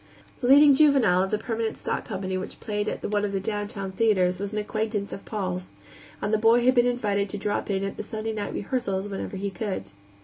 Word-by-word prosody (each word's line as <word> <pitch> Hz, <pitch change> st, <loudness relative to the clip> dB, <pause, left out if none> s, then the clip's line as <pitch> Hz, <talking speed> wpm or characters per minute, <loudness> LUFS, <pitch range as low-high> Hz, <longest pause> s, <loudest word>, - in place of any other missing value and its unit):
The 245 Hz, -, -1 dB
leading 285 Hz, +2 st, +8 dB
juvenile 265 Hz, -11 st, +5 dB
of 190 Hz, -, 0 dB
the 215 Hz, -, +1 dB
permanent 225 Hz, 0 st, -3 dB
stock -, -, -3 dB
company 190 Hz, -2 st, -3 dB
which 185 Hz, -, -5 dB
played 210 Hz, 0 st, -2 dB
at -, -, -5 dB
one 205 Hz, -1 st, +1 dB
of 200 Hz, -1 st, -1 dB
the 195 Hz, -, 0 dB
downtown 205 Hz, -1 st, -4 dB
theaters 185 Hz, -3 st, +2 dB
was 200 Hz, 0 st, -3 dB
an 215 Hz, -, -4 dB
acquaintance 210 Hz, -1 st, -2 dB
of 195 Hz, -, -8 dB
Paul's, 185 Hz, -4 st, -3 dB, 0.6 s
and 210 Hz, -, 0 dB
the 215 Hz, -, +3 dB
boy 230 Hz, +2 st, +4 dB
had 255 Hz, -, +6 dB
been 245 Hz, -1 st, +4 dB
invited 205 Hz, -5 st, 0 dB
to 205 Hz, -, -4 dB
drop 205 Hz, +1 st, -2 dB
in 195 Hz, -1 st, 0 dB
at 195 Hz, -, -4 dB
the -, -, -3 dB
Sunday 220 Hz, +1 st, -4 dB
night 210 Hz, -1 st, -3 dB
rehearsals 200 Hz, -4 st, -2 dB
whenever 195 Hz, 0 st, -5 dB
he 200 Hz, +1 st, -3 dB
could. 190 Hz, -, -4 dB
205 Hz, 225 wpm, -26 LUFS, 195-225 Hz, 0.6 s, leading